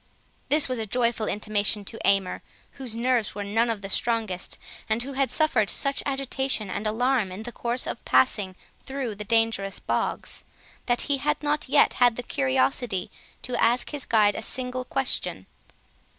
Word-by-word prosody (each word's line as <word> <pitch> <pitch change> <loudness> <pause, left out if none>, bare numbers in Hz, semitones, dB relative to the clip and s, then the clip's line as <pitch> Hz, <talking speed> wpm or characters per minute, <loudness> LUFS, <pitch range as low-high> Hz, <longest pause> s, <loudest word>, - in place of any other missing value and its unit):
This 300 0 +5
was 255 -2 -2
a 220 - -3
joyful 235 -1 +1
intimation 210 -1 0
to 225 - -6
Aymer, 195 -2 +2 0.3
whose 255 -5 -6
nerves 240 -2 0
were 205 - -3
none 225 +4 +1
of 215 -3 -3
the - - -4
strongest, 220 -3 -1 0.3
and 220 +2 0
who 275 +2 -6
had 270 0 +1
suffered 255 -10 +2
such 275 0 +1
agitation 265 -6 -1
and 215 - -2
alarm 235 -2 +1
in 190 +4 -7
the 240 - -6
course 240 +1 -1
of - - -5
passing 185 - +3 0.3
through 265 -4 -4
the 210 +1 -6
dangerous 225 -3 +1
bogs, - - -2 0.4
that 240 0 +2
he 285 -2 0
had 295 +2 -1
not 295 -2 -1
yet 290 +1 +5
had 245 -2 +6
the 245 - -5
curiosity 135 - 0 0.3
to 250 - -3
ask 235 +2 +2
his 290 -3 -1
guide 210 -2 +4
a - - -5
single 255 +2 -1
question. 270 +1 -1
230 Hz, 170 wpm, -26 LUFS, 205-260 Hz, 0.4 s, had